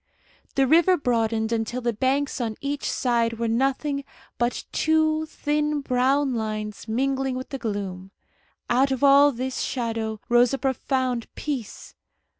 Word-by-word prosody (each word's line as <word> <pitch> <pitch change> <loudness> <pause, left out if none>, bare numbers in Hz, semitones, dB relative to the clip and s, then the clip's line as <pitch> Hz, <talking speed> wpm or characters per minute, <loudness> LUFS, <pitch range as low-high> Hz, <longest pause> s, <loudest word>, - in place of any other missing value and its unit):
The 270 - +4
river 340 +6 +5
broadened 225 -4 0
until 230 +2 -1
the 235 -1 0
banks 265 +4 0
on 225 -2 -2
each 280 0 -3
side 235 -2 +1
were 230 0 -1
nothing 275 +4 0 0.4
but 240 0 0
two 315 0 +2
thin 300 -1 -1
brown 265 +1 +1
lines 215 -2 -4
mingling 265 +3 0
with 255 0 -6
the 270 - -5
gloom. 195 -4 -4 0.6
Out 260 +3 +3
of 265 +1 -2
all 280 +1 +7
this 255 +1 -4
shadow 225 -3 -2
rose 240 +2 +4
a - - -4
profound 260 -2 -1
peace. 270 -8 -5
255 Hz, 140 wpm, -24 LUFS, 230-280 Hz, 0.6 s, all